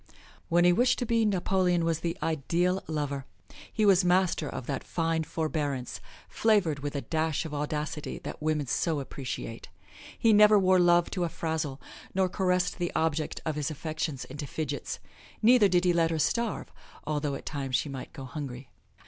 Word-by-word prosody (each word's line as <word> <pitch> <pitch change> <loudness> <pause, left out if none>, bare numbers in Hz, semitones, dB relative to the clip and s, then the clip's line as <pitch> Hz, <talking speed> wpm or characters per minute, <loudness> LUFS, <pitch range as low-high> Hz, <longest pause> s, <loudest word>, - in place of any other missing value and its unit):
When 175 0 +4
he 180 - +6
wished 245 +7 +3
to 245 - -1
be, 230 -1 +2
Napoleon 185 -3 +2
was 165 -1 0
the 170 0 -3
ideal 170 +4 0
lover; 145 -3 -3 0.4
he 215 - +1
was 195 -2 +5
master 180 -4 +2
of 125 - -6
that 135 0 -3
fine 165 -1 0
forbearance, 150 -6 -3 0.3
flavored 200 -10 +2
with 145 +1 -4
a 140 - -1
dash 160 0 -1
of 155 - -6
audacity, 150 +1 -3
that - - -7
women 155 -1 0
so 155 +4 0
appreciate. 130 -4 -6 0.5
He 225 -1 +4
never 210 0 +7
wore 185 -1 +4
love 175 -1 +4
to 180 - -1
a 170 - 0
frazzle, 160 -5 -3 0.4
nor 190 -1 +2
caressed 180 -1 0
the 175 -1 -1
object 160 -1 0
of 155 -2 -1
his 150 -2 -1
affections 155 -2 -4
into 145 +2 -7
fidgets; 155 +3 -4 0.5
neither 235 -2 +7
did 180 -1 +2
he 175 - +4
let 165 -1 +3
her 165 - -1
starve, 230 +8 -1 0.3
although 145 -1 -1
at - - -8
times 135 -3 -2
she 135 - +1
might 135 -2 -7
go 135 - -8
hungry. 130 -2 -7
160 Hz, 175 wpm, -28 LUFS, 145-180 Hz, 0.5 s, never